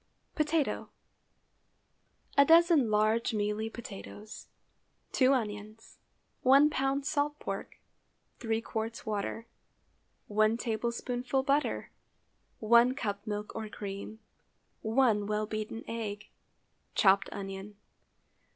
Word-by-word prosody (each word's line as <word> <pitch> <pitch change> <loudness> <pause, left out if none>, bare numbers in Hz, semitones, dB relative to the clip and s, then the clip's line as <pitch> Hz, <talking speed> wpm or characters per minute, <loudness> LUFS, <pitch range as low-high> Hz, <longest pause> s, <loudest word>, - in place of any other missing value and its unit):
POTATO. 305 -1 0 1.5
A 280 - +8
dozen 330 -4 +5
large 215 +2 +2
mealy 210 +1 -1
potatoes. 210 -1 -9 0.6
2 260 0 +4
onions. 215 -3 -3 0.4
1 275 +4 +6
lb. 270 0 0
salt 295 -1 0
pork. - - -6 0.6
3 225 -1 -1
qts. 225 +1 -4
water. 215 +1 -3 0.8
1 215 +2 +2
tablespoonful 245 +3 -1
butter. 280 +2 0 0.7
1 235 +3 +5
cup 205 -4 -4
milk 210 0 -4
or 220 -1 -4
cream. 200 +1 -6 0.6
1 220 -3 +2
well 210 0 0
beaten 215 +1 -5
egg. 210 -2 -5 0.7
Chopped 195 -1 +4
onion. 195 +1 -7
225 Hz, 95 wpm, -31 LUFS, 210-260 Hz, 1.5 s, A